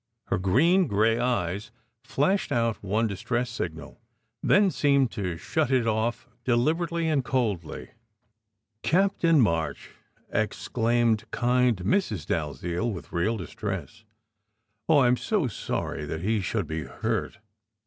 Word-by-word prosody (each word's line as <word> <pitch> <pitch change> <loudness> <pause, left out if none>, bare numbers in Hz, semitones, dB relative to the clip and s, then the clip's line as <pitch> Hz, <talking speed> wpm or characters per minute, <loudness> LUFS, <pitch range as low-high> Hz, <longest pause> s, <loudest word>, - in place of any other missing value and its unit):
Her 95 - +1
green 160 - +3
gray 110 +3 +2
eyes 105 -3 -1 0.3
flashed 190 +8 0
out 115 -2 0
one 105 +4 +1
distress 120 +4 -2
signal, 85 0 -6 0.4
then 200 -2 +4
seemed 140 -5 +2
to 90 -6 -3
shut 155 - -1
it 130 -3 +2
off 115 +2 -1 0.2
deliberately 165 +8 +1
and 150 -4 +1
coldly. 105 - -2 0.9
"Captain 175 -3 +3
March!" 80 - 0 0.4
exclaimed 115 +1 0
kind 125 -1 +2
Mrs. 105 - 0
Dalziel, 85 - -2
with 85 -7 -8
real 105 +7 +1
distress. 100 +2 -6 0.9
"Oh, 155 - +6
I 130 -3 +5
m 125 +1 +3
so 210 - 0
sorry 105 -8 -3
that 80 +2 -4
he 105 +3 +1
should 100 +1 -1
be 80 0 -4
hurt!" 65 - -3
115 Hz, 125 wpm, -26 LUFS, 95-130 Hz, 0.9 s, Oh